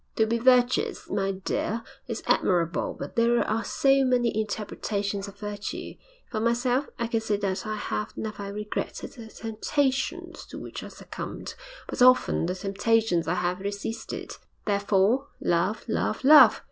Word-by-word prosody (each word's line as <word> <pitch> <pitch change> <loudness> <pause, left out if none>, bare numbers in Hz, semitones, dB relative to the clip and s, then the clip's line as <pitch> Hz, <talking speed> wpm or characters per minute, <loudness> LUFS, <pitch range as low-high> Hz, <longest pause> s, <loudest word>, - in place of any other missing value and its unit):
To 220 - +3
be 230 +1 0
virtuous, 250 0 +3
my 195 -1 0
dear, 200 +4 -2 0.2
is 230 -2 -4
admirable, 170 -2 +1
but - - -7
there 235 +1 +3
are 225 +1 0
so 275 0 +3
many 245 -3 +2
interpretations 205 -1 -2
of 200 0 -11
virtue. 205 0 -5 0.4
For 220 - -1
myself, 245 +4 +1
I 235 - -1
can 230 -1 0
say 215 -2 0
that 200 +2 -2
I 215 - -2
have 210 0 -4
never 205 -2 -5
regretted 210 +1 -4
the 230 -3 -10
temptations 270 +10 -2
to - - -9
which - - -7
I - - -7
succumbed, - - -7 0.3
but - - -4
often 255 -8 +5
the 180 - -1
temptations 200 -2 +1
I 170 - +1
have 180 +1 -1
resisted. 205 +3 -5 0.3
Therefore, 205 +5 +2
love, 180 +6 0
love, 220 +1 -1
love! 300 +3 +8
220 Hz, 150 wpm, -27 LUFS, 200-240 Hz, 0.4 s, love